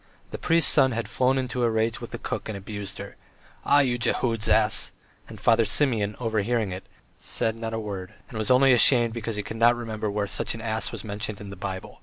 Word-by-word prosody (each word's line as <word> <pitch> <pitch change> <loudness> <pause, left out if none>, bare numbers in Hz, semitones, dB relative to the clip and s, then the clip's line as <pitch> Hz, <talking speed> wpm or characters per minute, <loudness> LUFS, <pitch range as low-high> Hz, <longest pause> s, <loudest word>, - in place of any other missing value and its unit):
The - - -6
priest's 165 -1 +4
son 130 -2 +4
had 115 0 -3
flown 130 +1 +1
into 125 -1 -2
a 120 - +3
rage 110 0 -1
with - - -7
the - - -6
cook - - -5
and 105 - -4
abused 100 0 -6
her: 100 0 -9 0.5
"Ah, 145 0 +5
you 125 -3 0
Jehud's 115 -2 0
ass!" 110 0 +3 0.4
and - - -10
Father 115 -1 +4
Simeon 110 -6 +1
overhearing 110 -2 -1
it, 95 +1 -7 0.3
said 110 -1 -1
not 115 0 -4
a - - -2
word, 100 -4 -6
and - - -13
was 110 - -1
only 130 +1 +6
ashamed 120 -1 +5
because 115 -1 -4
he 105 - -3
could 105 +3 -7
not 120 +1 +5
remember 110 -3 -4
where 100 0 -1
such 100 - -2
an 115 - -8
ass 110 0 -2
was - - -6
mentioned 105 -1 -4
in 100 -2 -9
the - - -7
Bible. 95 0 -7
110 Hz, 225 wpm, -25 LUFS, 105-120 Hz, 0.5 s, only